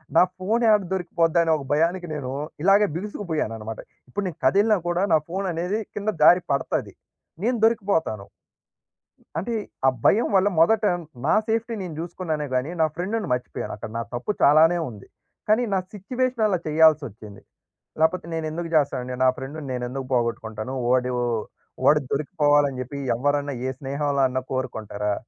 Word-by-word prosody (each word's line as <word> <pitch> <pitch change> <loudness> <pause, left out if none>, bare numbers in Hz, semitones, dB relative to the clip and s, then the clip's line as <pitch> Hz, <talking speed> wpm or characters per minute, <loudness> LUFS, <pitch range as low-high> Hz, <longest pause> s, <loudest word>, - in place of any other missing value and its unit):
నా 170 - +8 0.2
ఫోన్ 220 +6 0
యాడ 210 -1 +5
దొరికిపోద్దా 170 -2 +1
అనే 165 - +1
ఒక 140 - -8
భయానికి 170 +4 +1
నేను 135 -4 -4 0.3
ఇలాగే 200 +2 +5
బిగుసుకుపోయానన్నమాట. 155 - -4 0.3
ఇప్పుడు 200 +10 -3
నేను 170 - -7
కదిలినా 210 +7 +4
కూడా, 175 +2 +1
నా 160 - +6
ఫోన్ 190 +2 -2
అనేది 180 +6 -1 0.2
కింద 210 +1 -2
జారి 180 +2 +7
పడతాది, 140 - -2 0.5
నేను 240 +2 +1
దొరికిపోతాను. 190 - 0 1.1
అంటే, 215 +8 -2 0.3
ఆ - - +8 0.2
భయం 225 +4 +4
వల్ల 190 +1 +4
మొదట 220 +6 +4 0.4
నా - - +3
సేఫ్టీ 230 +1 -1
నేను 175 -5 -6
జూసుకున్నానే 165 -3 -3
గానీ 130 +6 0
నా 160 - +6
ఫ్రెండ్‌ని 200 +3 -2
మర్చిపోయాను. 125 0 -4
అక్కడ 110 - -7
నా 115 - -1
తప్పు 120 +12 -2
చాలానే 160 +4 +6
ఉంది. 105 -4 -12 0.4
కానీ 220 +3 +4
నా 190 - +3
సిట్యుయేషన్ 245 +3 -1
అలా 190 - +1
చేయాల్సొచ్చింది. 145 -10 +2 0.6
లేకపోతే 160 +2 +2
నేను 160 -1 -2
ఎందుకు 170 +2 -4
జేస్తానండి 130 -4 +1
నా 130 - +6
ఫ్రెండ్‌ని 145 +4 -6
నేను 125 -1 -3
ఎందుకు 135 0 -5
పోగొట్టుకుంటాను. 115 0 -2
వోడు 125 0 +2 0.7
వాడు 150 0 +6
దొరికిపోవాలని 145 -3 +2
చెప్పి 135 +3 -6 0.2
ఎవ్వరన్నా 145 +3 0
ఏ - - 0
స్నేహంలో 140 0 -1
అన్నా 130 0 -2
కోరుకుంటారా? 110 -5 -2
160 Hz, 150 wpm, -24 LUFS, 130-190 Hz, 1.1 s, నా